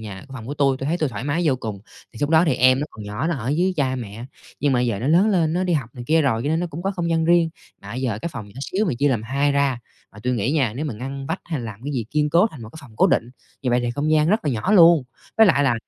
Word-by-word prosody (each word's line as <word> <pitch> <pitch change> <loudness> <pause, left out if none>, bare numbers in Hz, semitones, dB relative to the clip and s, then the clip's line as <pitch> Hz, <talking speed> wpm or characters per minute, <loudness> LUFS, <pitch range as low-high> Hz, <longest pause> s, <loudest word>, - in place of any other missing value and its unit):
nhà 100 -3 -8
phòng 115 -3 -8
của 145 - -4
tui, 135 -2 +2
tui 135 - -5
thấy 170 +3 0
tui 155 - 0
thoải 115 +1 -6
mái 160 +5 0
vô 140 -5 +2
cùng. 110 -5 -6 0.3
Thì 110 - -12
lúc 145 +1 0
đó 160 +1 +5
thì 135 - +2
em 130 +2 +4
nó 150 - -2
còn 105 - -10
nhỏ, 105 +9 -3
nó 170 - 0
ở 120 0 -5
dưới 180 +6 +1
cha 130 -3 +1
mẹ, 115 0 -7 0.4
nhưng 145 -2 +2
mà 125 - +2
giờ 115 -5 0
nó 125 - -3
lớn 180 +7 +4
lên, 165 -6 +2
nó 180 +2 0
đi 180 - 0
học 130 -7 -1
này 120 -1 -8
kia 160 +1 +3
rồi 115 -4 +1
cho 145 - -2
nên 160 +2 +1
nó 175 - -1
cũng 165 +4 -6
có 195 - 0
không 175 -3 -3
gian 165 -1 +1
riêng. 170 -1 +3 0.3
Mà 100 - -11
bây 125 - -4
giờ 120 -5 -1
cái 170 - -2
phòng 110 -6 -7
nhỏ 105 - -13
xíu 195 +9 -1
mà 175 - 0
chia 145 - +3
làm 115 -5 0
2 140 +4 0
ra, 140 -3 +1 0.3
mà 105 - -14
tui 125 0 0
nghĩ 120 +4 0
nha 130 -9 +1
nếu 150 - -3
mà 140 - -3
ngăn 135 +4 -6
vách - - -3
hay 160 -6 -3
làm 110 -2 -7
cái 145 - -3
gì 120 -5 -2
kiên 150 0 +1
cố 175 +7 +5
thành 135 -7 -11
một 110 - -8
cái 160 - -11
phòng 115 -7 -16
cố - - +5
định, 120 - +1 0.3
như 125 - 0
vậy 120 0 +2
thì 120 0 -1
không 145 +5 -2
gian 155 0 +3
rất 215 +3 +1
là 150 - +1
nhỏ 120 - -1
luôn. 170 -6 +7 0.3
Với 220 -1 +7
lại 145 -5 +4
là 125 -3 +3
140 Hz, 335 wpm, -22 LUFS, 120-160 Hz, 0.4 s, luôn